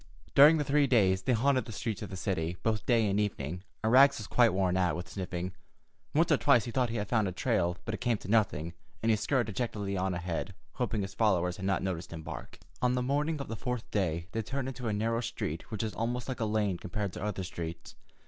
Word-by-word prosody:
During 150 +4 +8
the 150 - +1
three 145 0 +3
days, 95 -7 +3
they 125 - +1
haunted 130 +3 +2
the 115 - -8
streets 110 +1 -3
of 105 - -5
the 95 - -6
city, 90 -2 -2
both 110 -1 0
day 115 -3 +4
and 100 +1 +1
evening, 90 -5 -2 0.2
and 110 +2 +2
Rags 140 +2 +7
was 105 - -6
quite 120 +1 +4
worn 90 -1 +1
out 90 -2 +2
with 85 0 -5
sniffing. 90 -1 -4 0.6
Once 165 +2 +3
or 145 - +6
twice 120 -4 +4
he 120 - -4
thought 125 0 +1
he 115 - -4
had 105 -2 -2
found 110 -2 +2
a - - -2
trail, 85 0 0
but 115 - -3
it - - -5
came 120 -2 +1
to 90 - -11
nothing, 95 -7 +1 0.3
and 115 - +4
he - - +5
scurried 125 +3 +1
dejectedly 105 -2 -3
on 95 -1 0
ahead, 85 +2 -3 0.2
hoping 115 -5 -1
his 95 0 -6
followers 90 -5 +1
had 95 -1 -3
not 95 -1 +1
noticed 95 0 -3
him 80 -1 -7
bark. - - -8 0.2
On 125 0 +2
the 125 - 0
morning 145 +4 0
of 140 - -5
the 115 - -4
fourth 125 +1 -4
day 85 -5 0
they 115 - -1
turned 135 +4 -3
into 130 -2 -5
a - - +1
narrow 115 +3 0
street 115 -9 -4
which 110 0 -3
was 110 - -3
almost 120 +2 -2
like 130 -2 -4
a 115 - 0
lane 105 -4 0
compared 100 0 -3
to - - -6
other 105 -2 -2
streets. 85 -2 -6
105 Hz, 245 wpm, -30 LUFS, 95-120 Hz, 0.6 s, During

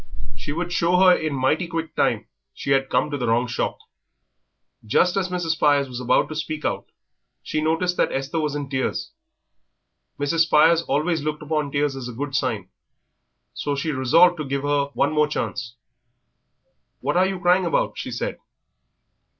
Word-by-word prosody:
She 105 +8 -5
would 175 +3 -3
show 175 +1 +2
her 185 -1 +7
in 155 -2 -2
mighty 145 +7 +1
quick 165 -1 -4
time - - +1 0.3
she 140 - -4
had 135 -1 +2
come 150 - +1
to 145 - -3
the 120 - -1
wrong 115 +2 +2
shop. 125 0 -2 1.1
Just 175 - +2
as 190 -2 0
Mrs. 175 -2 -1
Spires 145 -3 +2
was 125 -1 -6
about 125 0 +2
to 155 - -6
speak 155 0 -4
out 100 0 -2 0.5
she 155 - -2
noticed 165 +3 0
that - - +2
Esther 135 +5 -2
was 150 -2 -1
in 145 -1 -3
tears. 130 -1 -2 1.1
Mrs. 145 +3 0
Spires 160 +1 +5
always 160 +2 0
looked 150 0 -3
upon 150 -1 -1
tears 145 -1 0
as 130 -2 -6
a 125 - -7
good 140 +4 -5
sign, 115 -10 -1 0.8
so 145 -1 -2
she 145 +3 -2
resolved 165 +7 +4
to 155 - -3
give 140 0 -3
her 145 -1 +1
one 145 +2 +1
more 150 -1 +3
chance. 120 -5 -4 1.3
"What 145 +3 -1
are 185 +1 +4
you 190 -1 -3
crying 180 0 +3
about?" 165 - 0
she - - -5
said. - - -4
150 Hz, 175 wpm, -23 LUFS, 135-165 Hz, 1.3 s, her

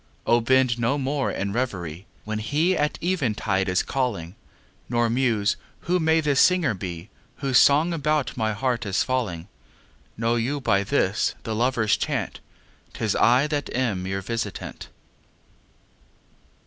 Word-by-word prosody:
O 120 0 +3
bend 125 0 +3
no 120 +5 +1
more 140 0 -1
in 100 +1 -3
revery 95 -7 -3 0.2
When 110 0 -3
he 155 +11 +1
at 150 -2 0
eventide 110 - 0
is 90 0 +2
calling, 105 -11 -2 0.6
Nor 120 -1 +1
muse: 115 -5 +1 0.2
Who 180 +1 0
may 160 0 +3
this 145 -3 +2
singer 180 -9 +4
be 90 0 -7 0.2
Whose 135 -3 +3
song 155 +5 +4
about 150 -2 0
my 110 -1 0
heart 120 +2 -1
is 95 - +1
falling? 100 -10 -2 0.7
Know 115 +2 +1
you 130 +5 -1
by 100 -7 +2
this, 100 -3 0
the 110 - -3
loverâs 115 -2 +1
chant, - - -2 0.6
âTis 110 -2 -1
I 125 +5 +5
that 150 -2 -2
am 105 -8 -1
your 95 0 -3
visitant. 115 +3 -5
120 Hz, 140 wpm, -24 LUFS, 105-140 Hz, 0.7 s, I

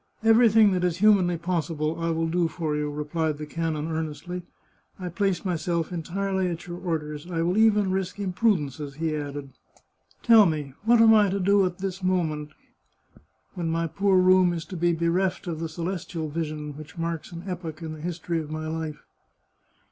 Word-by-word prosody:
" - - -33
Everything 225 -2 +6
that 180 -1 0
is 180 -1 +1
humanly 185 -4 +4
possible 165 -2 -2
I 165 0 -1
will 165 0 0
do 170 +1 +1
for 160 -2 -3
you," 150 0 -1
replied 150 +1 -2
the 150 - -6
canon 160 0 -2
earnestly. 160 +3 -4 0.3
" - - -38
I 180 -1 -4
place 190 +2 -1
myself 170 -1 -1
entirely 190 +3 -1
at 170 -1 -4
your 175 0 -7
orders. 155 -2 -4
I 165 -2 -1
will 175 +2 +1
even 210 -3 +4
risk 190 0 -2
imprudences," 180 - -1
he 160 0 -1
added. 145 -2 -5 0.4
" - - -37
Tell 225 -4 +7
me, 150 -4 -3
what 235 0 +5
am 225 -1 +7
I 210 -2 +5
to 195 +2 -1
do 200 +1 +4
at 180 -1 -6
this 195 0 -4
moment, 160 -5 0 1.0
when 175 -3 -3
my 165 +1 0
poor 190 +4 +2
room 185 -1 +5
is 165 -1 -4
to 190 - -8
be 175 0 +2
bereft 170 +3 0
of 165 -3 -4
the 165 0 -3
celestial 165 -1 -4
vision 150 -2 -4
which 155 +2 -11
marks 165 0 -3
an 170 0 -8
epoch 170 -4 -6
in 160 -1 -5
the 155 - -9
history 170 0 -2
of 155 -2 -6
my 155 0 -4
life?" 160 -1 -4
170 Hz, 190 wpm, -26 LUFS, 155-185 Hz, 1.0 s, Tell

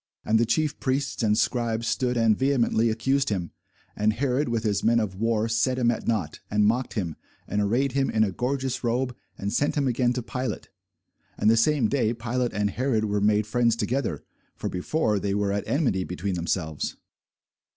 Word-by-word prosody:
And 110 +1 +3
the 115 - +2
chief 150 +4 0
priests 135 0 -1
and 105 -2 +2
scribes 115 -1 0
stood 125 -1 0
and 115 -2 +4
vehemently 120 -3 +2
accused 135 +5 +1
him. 90 -6 -2 0.4
And 105 +1 +2
Herod 130 +3 0
with 115 -1 -1
his 105 -2 0
men 115 +1 +4
of 105 -4 -2
war 110 +2 0
set 120 +3 +1
him 120 -2 +3
at 115 - -5
nought, 105 -9 -1
and 105 0 +2
mocked 120 +4 0
him, 85 -8 -3 0.3
and 105 +2 0
arrayed 120 +7 +1
him 135 +1 +1
in 110 - +2
a 100 - 0
gorgeous 130 +5 -2
robe, 125 +1 0 0.2
and 100 +1 -3
sent 145 - +1
him 140 -3 +1
again 125 0 +1
to 125 -1 -3
Pilate. 125 -2 -4 0.7
And 105 - +4
the - - +5
same 120 +1 +3
day 120 -2 +1
Pilate 120 +1 -2
and 105 0 0
Herod 120 -2 0
were 105 -1 0
made 105 0 +3
friends 115 +1 +2
together: 120 +3 -2 0.3
for - - -4
before 105 - 0
they 100 0 -1
were 100 -1 0
at 100 0 -2
enmity 125 - +1
between 90 +2 -3
themselves. 85 -3 -2
115 Hz, 195 wpm, -26 LUFS, 105-130 Hz, 0.7 s, the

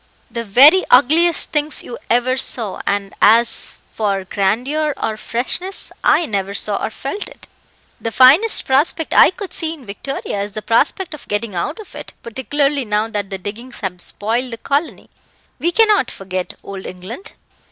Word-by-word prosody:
"The 235 -1 -3
very 275 - +6
ugliest 315 +7 +4
things 300 0 -2
you 235 - -8
ever 245 +2 +2
saw 230 -6 -1
and 200 -1 -1
as 230 +3 +3 0.2
for 200 -3 -1
grandeur 250 +11 -1
or 220 - -2
freshness, 260 - -3
I 340 - +4
never 200 -3 -3
saw 205 0 -1
or - - -1
felt 280 - -6
it. - - -12 0.5
The 230 - -3
finest 275 - +5
prospect 290 +4 +1
I - - +7
could 380 +1 -8
see 325 -1 -1
in 280 -6 -16
Victoria 205 0 -5
is 205 0 -5
the 215 - -6
prospect 300 +10 +1
of 300 - -11
getting 205 0 -2
out 185 - -3
of 435 - -12
it, - - -9
particularly 275 +4 -1
now 215 0 -1
that 205 -3 -4
the 195 - -4
diggings 220 +7 -8
have 180 -3 -4
spoiled 230 +7 -2
the 230 - -5
colony. 285 +7 -3 0.5
We 345 - 0
cannot 425 - +4
forget 185 -1 -5
Old 195 -1 -8
England." 215 - -9
240 Hz, 165 wpm, -18 LUFS, 205-300 Hz, 0.5 s, I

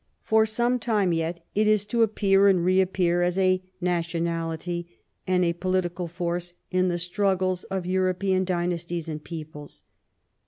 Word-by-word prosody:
For 220 0 +3
some 240 +3 0
time 210 -7 +1
yet 165 +1 -3
it 210 +1 +2
is 215 -1 +3
to 230 +3 0
appear 200 -3 +4
and 185 -3 +3
reappear 185 -1 +2
as 175 +1 +1
a 185 -1 +3 0.2
nationality 170 0 -2 0.3
and 180 -1 +2
a 170 - +1
political 180 0 -1
force 175 0 -3 0.2
in 185 0 +2
the 175 -1 0
struggles 185 +1 0
of 190 -2 -3
European 185 +1 +1
dynasties 175 -2 -2
and 155 -1 -5
peoples. 155 -3 -9
180 Hz, 145 wpm, -25 LUFS, 170-190 Hz, 0.3 s, appear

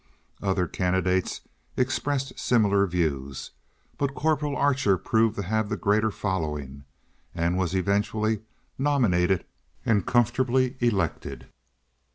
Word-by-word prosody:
Other 95 -2 +1
candidates 95 +1 0 0.4
expressed 135 +1 0
similar 100 -4 +3
views, 70 -7 -2 0.5
but 140 -1 -1
Corporal 150 -2 0
Archer 130 -9 +2
proved 110 +3 +1
to 100 - -3
have 110 +2 -1
the - - -2
greater 105 +2 +2
following, 75 -9 -3 0.5
and 85 +1 0
was 95 -1 0
eventually 105 +3 0 0.4
nominated 100 -11 +2 0.4
and 105 -4 +3
comfortably 125 +2 +2
elected. 100 -9 -1
100 Hz, 105 wpm, -26 LUFS, 90-125 Hz, 0.5 s, similar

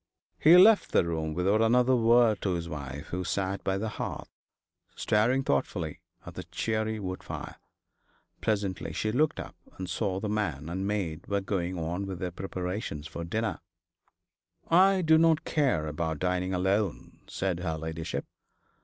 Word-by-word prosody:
He 165 +4 +8
left 205 +3 +6
the - - +4
room 80 -2 -2
without 100 +5 +2
another 125 +3 +4
word 115 -2 +4
to 95 -3 0
his 85 -1 -4
wife, 75 -1 -7
who 90 +1 -3
sat 95 +2 -2
by 95 0 0
the 110 +3 -2
hearth - - -5 0.6
staring 120 +6 +2
thoughtfully 70 - -1 0.3
at - - -8
the - - -6
cheery 110 -1 -2
wood 95 -2 -5
fire. - - -7 0.8
Presently 100 -6 -1
she 110 +7 -1
looked 150 +6 +1
up, - - -7 0.2
and 95 - -5
saw 95 +1 -1
that 105 - -3
the 105 - -1
man 80 -8 -2
and 95 +3 -2
maid 90 -6 -3
were 100 0 0
going 95 -2 -2
on 85 +4 -3
with 95 -2 -5
their 90 0 -3
preparations 90 -4 -4
for 80 +1 -6
dinner. 105 +2 -2 1.1
'I 190 +2 +5
do 160 0 +5
not 165 -1 +3
care 135 - +1
about 80 +1 -2
dining 90 +2 -1
alone,' 95 +1 -1
said 95 -3 -2
her 80 -3 -2
ladyship. 80 0 -4
95 Hz, 160 wpm, -28 LUFS, 85-110 Hz, 1.1 s, He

